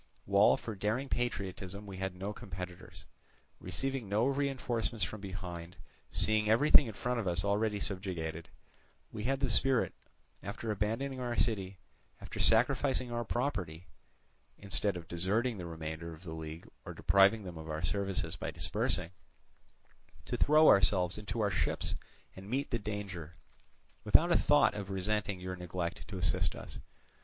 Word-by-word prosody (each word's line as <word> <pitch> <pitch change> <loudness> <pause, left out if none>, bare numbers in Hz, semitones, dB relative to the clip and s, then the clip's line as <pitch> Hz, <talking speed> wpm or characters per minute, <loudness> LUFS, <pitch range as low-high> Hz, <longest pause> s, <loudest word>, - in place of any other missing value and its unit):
While 100 +1 +5
for 110 - -6
daring 110 +7 -1
patriotism 100 -4 -3
we 100 -2 -8
had 95 -1 -3
no 100 +3 -4
competitors. 90 -2 -8 0.5
Receiving 125 +5 -2
no 105 +4 +2
reinforcements 130 -5 0
from 95 +5 -3
behind, 90 -3 -6 0.3
seeing 110 0 +2
everything 135 +3 +6
in 110 - -5
front 125 +1 -1
of 105 - -2
us 85 +1 0
already 105 +1 +1
subjugated, 85 -5 -4 0.6
we 105 - -5
had 135 +2 0
the 135 - +2
spirit, 130 +1 +2 0.5
after 110 +3 -4
abandoning 115 +7 -1
our 120 -1 -2
city, 100 -6 0 0.4
after - - -8
sacrificing 130 -3 +3
our 120 0 -1
property 90 - -2 0.7
(instead 100 -1 +1
of 85 -2 -9
deserting 100 +6 0
the 85 - -5
remainder 80 0 -5
of 80 - -16
the 80 -3 -6
league 80 0 -7 0.2
or - - -8
depriving 100 +2 +4
them 90 -3 -7
of 80 0 -8
our 80 +1 -3
services 100 +2 0
by - - -4
dispersing), 90 0 -1 1.1
to - - -2
throw 155 +1 +5
ourselves 90 0 +4
into 105 +2 -3
our 100 -1 +2
ships 90 - 0 0.4
and 95 +2 -10
meet 135 +4 -1
the 120 - 0
danger, 100 -6 -5 0.7
without - - +5
a - - +5
thought - - +4
of 100 -2 -5
resenting 100 0 -1
your 90 0 -4
neglect 90 0 -4
to 100 - -6
assist 90 +1 +1
us. - - -9
100 Hz, 150 wpm, -33 LUFS, 90-115 Hz, 1.1 s, everything